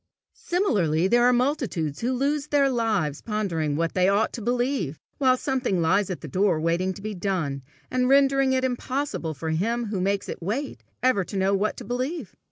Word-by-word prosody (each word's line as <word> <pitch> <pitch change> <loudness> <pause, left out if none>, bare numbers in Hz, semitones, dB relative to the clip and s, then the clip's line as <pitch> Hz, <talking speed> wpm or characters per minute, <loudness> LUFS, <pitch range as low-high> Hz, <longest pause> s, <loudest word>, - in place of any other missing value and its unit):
Similarly, 190 - +2
there 240 +4 +4
are 250 - +6
multitudes 245 - 0
who 240 +2 0
lose 285 +3 0
their 280 -2 +3
lives 210 - 0
pondering 175 -9 -1
what 165 +2 -1
they 185 0 +3
ought 205 +2 +1
to 235 - -5
believe, 240 - -1 0.2
while 260 -2 +4
something 255 -9 -1
lies 190 +4 +2
at 185 - -4
their 155 - -7
door 185 +1 +1
waiting 170 +4 0
to 200 - -11
be 215 0 -3
done, 175 -8 -2 0.3
and 255 0 +1
rendering 275 -1 +4
it 260 0 +1
impossible 250 - -2
for 160 +3 -3
him 230 +9 0
who 200 -3 -2
makes 200 +1 0
it - - -6
wait, 235 - -3 0.2
ever 255 -7 +3
to 200 - -5
know 190 +1 +2
what 200 +2 0
to - - -8
believe. 255 - -3
210 Hz, 190 wpm, -25 LUFS, 180-255 Hz, 0.3 s, are